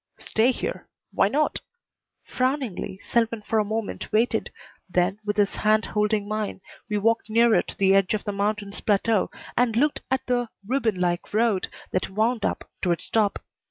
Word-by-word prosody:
"Stay 225 +3 +2
here. 435 - -3 0.3
Why 195 - +4
not?" 295 +8 0 0.6
Frowningly, 255 -8 -2
Selwyn 230 -2 0
for 220 +1 +1
a - - +3
moment 215 0 -4
waited, 220 0 +1 0.4
then, 180 +3 +1
with 205 0 -2
his 205 -1 +2
hand 215 +1 +3
holding 210 -1 0
mine, 215 -2 -3 0.3
we 210 - 0
walked 225 +2 +1
nearer 230 0 +5 0.2
the 195 -2 +4
edge 195 +1 +3
of 210 - -4
the 205 - -2
mountain's 205 0 -2
plateau 210 0 +2 0.3
and 240 -2 +2
looked 290 +5 +2
at 265 0 0
the 245 -2 0 0.2
ribbon 225 -5 0
like 175 +2 -1
road 220 -4 +2 0.2
that 185 - -1
wound 220 +3 0
up - - -2
to 180 - +1
its 170 - -3
top. 210 -3 +1
215 Hz, 165 wpm, -25 LUFS, 200-230 Hz, 0.6 s, nearer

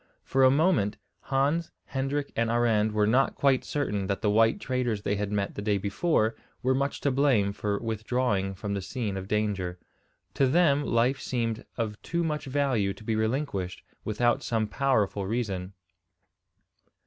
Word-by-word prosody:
For 135 0 +2
a 130 - +8
moment 145 - +2 0.3
Hans, 145 +5 +1 0.2
Hendrik, 140 +1 -2
and 115 0 +1
Arend 115 -2 +2
were 105 0 +2
not 125 +6 +3
quite 135 -2 +3
certain 105 -10 -2
that 100 -1 -2
the 105 - +3
white 115 +1 +4
traders 120 -5 -1
they 100 - 0
had 105 0 -2
met 100 -1 -1
the - - -5
day 105 -1 +1
before 110 - +1 0.3
were 130 +1 +3
much 140 +2 -1
to 140 - +1
blame 125 -7 +2
for 105 0 -1
withdrawing 110 -3 -1
from 100 +2 -4
the 100 - -2
scene 105 +1 -3
of 95 0 -5
danger. 100 -4 -1 0.6
To 135 - +3
them 145 -1 +3
life 125 +2 +2
seemed 115 -2 -2
of 110 -3 -3
too 170 0 -1
much 150 -2 -2
value 130 -8 0
to - - -14
be 110 0 -1
relinquished 110 -5 -2 0.2
without 120 +3 +1
some 115 -2 0
powerful 105 -5 0
reason. 100 -5 -2
115 Hz, 165 wpm, -28 LUFS, 105-135 Hz, 0.6 s, a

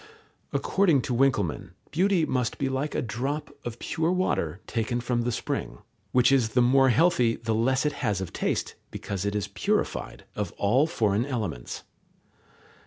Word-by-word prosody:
According 170 -10 +2
to 125 - -2
Winckelmann, 115 - +1 0.2
beauty 180 0 +3
must 125 -5 -1
be 135 - 0
like 135 +3 -2
a - - 0
drop 135 +6 -3
of 120 -1 -5
pure 160 +7 -1
water 100 - 0
taken 120 +1 -1
from 120 0 0
the 120 +1 0
spring, - - -3 0.3
which 125 0 +4
is 130 -5 +3
the - - +7
more 135 +2 +5
healthy 125 -4 +3
the 115 -1 -2
less 130 +5 +2
it 150 - +1
has 100 -2 +1
of 95 - -5
taste, - - -1 0.2
because 100 -1 -4
it 100 0 -1
is 100 -1 -1
purified 100 - -1
of - - -3
all 125 +9 +2
foreign 110 -6 +1
elements. 105 - -4
120 Hz, 165 wpm, -27 LUFS, 110-135 Hz, 0.3 s, the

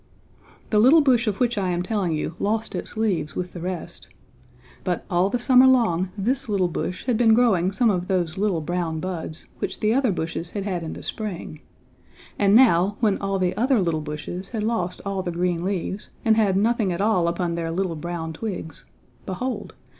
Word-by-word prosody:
The 210 - +4
little 270 +9 +7
bush 250 -5 +3
of 205 -2 -1
which 240 -4 +1
I 190 -2 0
am 175 0 -1
telling 195 -3 -1
you 155 +1 -2
lost 220 +2 -1
its - - -3
leaves 190 -9 -1
with 180 -1 -4
the 175 - -7
rest. 180 +1 -6 0.8
But 180 -2 -2
all 180 +2 +3
the 245 - 0
summer 255 +1 +6
long 195 -9 +3
this 250 +5 -1
little 190 -4 +1
bush 180 +4 -4
had 250 -3 +1
been 225 -2 +5
growing 195 -7 +3
some 225 +2 +2
of 180 -2 -2
those 175 -3 0
little 195 -4 0
brown 170 0 -2
buds, 170 -3 -5
which - - -4
the 215 +1 +2
other 260 -3 +2
bushes 165 -1 -3
had 200 +1 -4
had 185 -3 -2
in 160 - -5
the - - -9
spring, 180 -7 -5 0.8
and 200 0 +4
now, 205 -5 +5
when 210 -4 +2
all 195 0 -1
the 185 -1 0
other 250 +1 +2
little 165 -4 0
bushes 155 +5 -6
had 220 -3 -3
lost 200 -6 -2
all 195 -1 -2
the 180 -1 -3
green 175 0 -1
leaves, 190 +1 -3 0.2
and 220 -1 +5
had 205 -4 +2
nothing 220 -1 +2
at 170 - -3
all 195 -4 +2
upon 170 0 -1
their 165 -1 -3
little 180 0 -1
brown 165 0 -5
twigs, 175 -5 -6 0.4
behold! 210 +3 -4
190 Hz, 200 wpm, -24 LUFS, 175-220 Hz, 0.8 s, little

